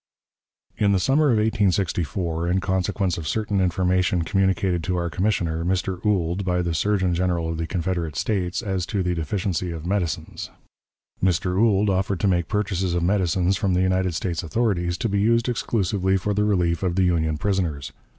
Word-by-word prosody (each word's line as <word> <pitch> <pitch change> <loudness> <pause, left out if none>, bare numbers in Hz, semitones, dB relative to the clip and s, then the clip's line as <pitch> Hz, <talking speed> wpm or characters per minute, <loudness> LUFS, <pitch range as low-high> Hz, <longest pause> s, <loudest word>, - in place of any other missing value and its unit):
In 100 -1 +3
the 95 - +2
summer 140 +9 +3
of 125 -6 +3
1864, 95 -5 0
in 90 +2 +2
consequence 95 -1 -1
of 80 - -6
certain 100 +2 0
information 90 -1 +1
communicated 95 -1 +1
to 90 +1 -1
our 85 -1 -2
commissioner, 85 -2 0
Mr. 95 +1 -1
Ould, 95 -2 0
by 90 -1 0
the 85 -1 -1
Surgeon 95 +1 +1
General 85 -2 0
of 80 -1 -3
the 80 - -2
Confederate 85 -4 -2
States, 95 - -1
as 95 -4 -2
to 100 -3 -1
the 90 0 0
deficiency 90 +1 -2
of 80 -1 -6
medicines. 85 -4 -2 0.7
Mr. 90 0 +1
Ould 105 0 +3
offered 95 0 0
to - - +2
make 85 -3 +1
purchases 95 -4 -1
of 85 - 0
medicines 95 0 +1
from 95 -1 0
the 90 - +2
United 95 -2 +1
States 85 +1 -2
authorities, 90 -1 -1
to 115 - -1
be 100 -1 0
used 115 +3 +2
exclusively 100 -5 0
for 105 +2 -1
the 105 +1 +1
relief 90 -5 +1
of 90 -3 -1
the 95 - +2
Union 80 -3 +1
prisoners. 85 -7 -1
95 Hz, 180 wpm, -23 LUFS, 85-100 Hz, 0.7 s, In